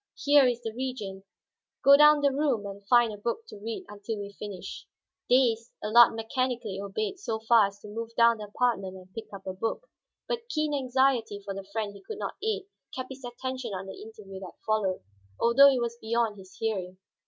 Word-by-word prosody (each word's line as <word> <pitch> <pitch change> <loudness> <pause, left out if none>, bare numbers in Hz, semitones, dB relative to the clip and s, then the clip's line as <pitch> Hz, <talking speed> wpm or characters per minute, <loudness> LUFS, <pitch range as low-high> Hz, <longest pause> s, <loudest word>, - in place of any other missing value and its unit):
Here 285 -2 +5
is 240 -1 -1
the 225 -1 -4
Regent; 220 -6 -5 0.6
go 280 +1 +9
down 300 0 +7
the 280 -1 +3
room 270 -7 0
and 200 0 -8
find 240 -2 +5
a - - -8
book 235 - -3
to - - -10
read 225 +2 -5
until 205 +2 -5
we 200 0 -6
finish." 195 -3 -8 0.4
Dazed, 240 -2 +3
Allard 230 +2 +6
mechanically 230 -3 -2
obeyed 215 - -3
so 225 - -2
far 225 -2 +5
as 200 0 -11
to - - -10
move 225 +2 -5
down 235 -1 +5
the 210 - -5
apartment 205 -3 -1
and 185 0 -14
pick 225 - -8
up 195 -1 -10
a 190 - -3
book. 225 - -3 0.4
But 475 0 -3
keen 305 -4 0
anxiety 260 -5 +1
for 200 0 -6
the 195 0 -6
friend 210 -1 -2
he 200 - -13
could 440 - -7
not - - -4
aid 435 -1 -1 0.3
kept 255 0 -5
his 265 0 -10
attention 245 -2 -5
on 190 +1 -5
the 190 - -9
interview 210 -3 -10
that 185 -2 -10
followed, 210 - 0 0.4
although 275 +4 +7
it 265 -2 +2
was 235 0 -3
beyond 225 -1 0
his 190 -1 -14
hearing. 190 -5 -3
225 Hz, 200 wpm, -28 LUFS, 200-255 Hz, 0.6 s, go